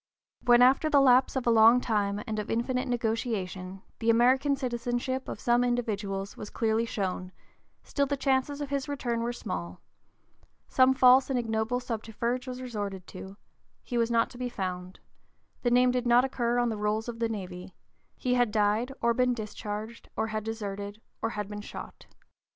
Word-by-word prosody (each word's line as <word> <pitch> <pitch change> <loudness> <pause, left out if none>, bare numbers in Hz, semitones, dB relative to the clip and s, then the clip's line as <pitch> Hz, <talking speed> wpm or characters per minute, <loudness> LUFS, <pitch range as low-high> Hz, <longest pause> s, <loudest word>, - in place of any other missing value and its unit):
When 240 0 +7
after 270 +5 +4
the 285 - +5
lapse 260 -1 +5
of 265 - -1
a 235 - +4
long 230 +2 +7
time 205 -3 -1
and 215 -1 -3
of 210 - -5
infinite 250 +3 -1
negotiation 215 -6 -2 0.2
the 230 - 0
American 260 +5 +4
citizenship 250 0 -2
of - - -6
some 240 0 +2
individual 215 -5 -1
was 210 - -8
clearly 225 0 0
shown, 185 -3 -3 0.5
still 280 -1 0
the 285 +1 -1
chances 270 +2 0
of 285 -1 -5
his 280 0 -2
return 245 -5 -2
were 235 +1 -1
small; 90 - -5 0.9
some 260 0 +4
false 260 +1 +6
and 265 - 0
ignoble 225 +1 -1
subterfuge 235 +1 -3
was 255 0 -6
resorted 205 -6 -5
to; 190 +1 -9 0.5
he 245 - -6
was 230 -1 +2
not 230 -1 +2
to 245 - -12
be 250 -1 -2
found; 185 -4 -5 0.6
the 240 - +1
name 250 +1 +4
did 250 -1 -1
not 240 +2 +5
occur 240 -2 -1
on 240 -1 +2
the 220 - -3
rolls 210 +2 -1
of 235 -1 -6
the 230 -1 0
navy; 185 -4 -7 0.4
he 250 -2 0
had 245 -2 +3
died, 210 +4 +1
or 235 0 +4
been 250 +1 +2
discharged, 215 0 -6
or 220 - 0
had 215 -1 -3
deserted, 205 -2 -5 0.2
or 225 - 0
had 210 -3 -4
been 210 0 -6
shot. - - -10
235 Hz, 180 wpm, -28 LUFS, 210-250 Hz, 0.9 s, When